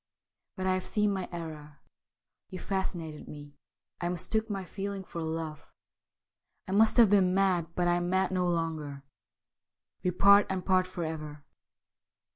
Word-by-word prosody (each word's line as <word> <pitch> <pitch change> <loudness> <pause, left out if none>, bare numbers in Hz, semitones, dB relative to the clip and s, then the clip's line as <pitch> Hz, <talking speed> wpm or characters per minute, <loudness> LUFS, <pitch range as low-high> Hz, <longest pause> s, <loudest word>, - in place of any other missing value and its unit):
' - - -61
But 185 - -3
I 185 - +3
have 185 0 -1
seen 210 -1 +1
my 190 -2 -4
error. 155 -3 -7 0.7
You 185 - -6
fascinated 175 -6 -4
me. 145 -1 -10 0.5
I 175 - -1
mistook 220 +5 -1
my 195 -2 -3
feeling 200 +1 -5
for 170 -2 -7
love. 160 -1 -4 1.0
I - - -5
must 220 +4 +4
have 225 -4 +7
been 185 -3 +4
mad, 180 -4 +1
but 175 -1 +1
I 175 0 +3
am 175 0 -2
mad 190 +1 +1
no 180 -1 +1
longer. 160 -5 -2 1.0
We 180 - +1
part, 200 +3 +6
and 190 -1 -3
part 185 -1 +3
for 180 -2 -5
ever. 155 -2 -6
180 Hz, 160 wpm, -30 LUFS, 160-190 Hz, 1.0 s, have